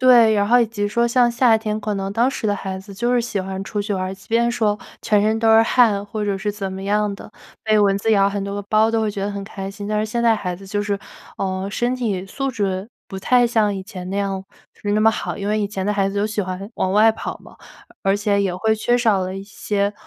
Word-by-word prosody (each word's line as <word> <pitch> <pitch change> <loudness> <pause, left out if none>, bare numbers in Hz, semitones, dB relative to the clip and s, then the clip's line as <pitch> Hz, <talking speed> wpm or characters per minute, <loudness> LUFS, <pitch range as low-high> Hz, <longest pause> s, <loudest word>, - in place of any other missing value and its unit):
对， 240 -4 +6
然 205 0 +2
后 245 +2 +5
以 235 - +3
及 205 -2 -2
说 235 +3 +1
像 240 0 +3
夏 235 -1 +4
天， 215 -1 -3
可 210 -1 -2
能 195 0 -3
当 235 +4 +2
时 225 - -3
的 205 - +2
孩 190 -1 -5
子 190 +1 -11
就 240 +5 0
是 245 - +3
喜 230 -4 -2
欢 190 +1 -5
出 205 - -3
去 205 0 -2
玩 185 - -2
儿， 185 +1 -4
即 195 - -19
便 235 +1 +2
说 215 -3 0 0.2
全 210 -1 +2
身 220 +1 +2
都 225 0 +2
是 225 - +7
汗 225 -4 +3
或 210 +1 -5
者 200 -1 0
是 205 +1 -2
怎 195 -2 -4
么 190 0 -6
样 210 +1 +1
的， 205 - -12 0.3
被 215 -1 +3
蚊 200 -1 +3
子 220 +2 +1
咬 195 -1 +4
很 200 0 -3
多 200 - -4
个 205 - -4
包 220 +1 +4
都 225 0 +1
会 215 -1 0
觉 200 -1 -5
得 205 - -2
很 200 -1 -5
开 195 -1 -6
心。 205 +1 -7
但 210 0 0
是 215 - +1
现 235 +2 -2
在 225 -2 +4
孩 180 -3 -3
子 195 +2 -12
就 205 +1 -1
是， 200 -1 -1 0.4
呃， 190 0 -2
身 245 +3 0
体 200 -7 -2
素 270 +7 -3
质 195 -4 -2 0.2
不 190 - -6
太 245 +4 +3
像 215 -3 +2
以 190 - -5
前 185 -3 -8
那 200 - -2
样 195 -1 -2 0.3
是 205 - -3
那 210 - +2
么 225 +1 +6
好， - - -4
因 200 0 -3
为 215 +1 +1
以 205 - 0
前 195 -2 -4
的 - - +1
孩 195 -1 +1
子 205 - -6
都 205 +1 +1
喜 210 -1 -2
欢 190 +3 -6
往 185 - -1
外 215 +2 +6
跑 - - -5
嘛， - - -15 0.5
而 195 0 +2
且 205 0 +1
也 190 -3 -1
会 220 +4 +1
缺 240 +3 +1
少 220 -5 +3
了 185 +1 -4
一 195 - -6
些， 200 0 -2
205 Hz, 300 characters per minute, -21 LUFS, 195-225 Hz, 0.5 s, 是